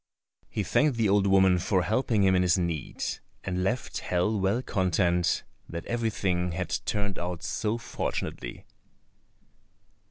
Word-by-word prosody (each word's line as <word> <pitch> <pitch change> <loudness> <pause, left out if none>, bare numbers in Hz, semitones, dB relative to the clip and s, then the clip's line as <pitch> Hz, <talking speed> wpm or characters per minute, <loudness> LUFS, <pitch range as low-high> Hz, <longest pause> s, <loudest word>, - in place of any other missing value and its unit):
He 105 - -2
thanked 145 +6 +2
the 115 -2 +3
old 100 0 +3
woman 95 -2 +5
for 95 0 +1
helping 110 0 +1
him 95 -1 +5
in 90 - +4
his 90 -1 +3
need, 85 -5 -3 0.4
and 90 -1 -1
left 120 +6 -1
hell 90 +4 0
well 100 +6 +1
content 90 -4 +1 0.3
that 85 0 -5
everything 100 -7 0
had 90 0 -2
turned 100 -2 -1
out 85 -1 -4
so 110 +1 -1
fortunately. - - -4
95 Hz, 135 wpm, -28 LUFS, 90-105 Hz, 0.4 s, woman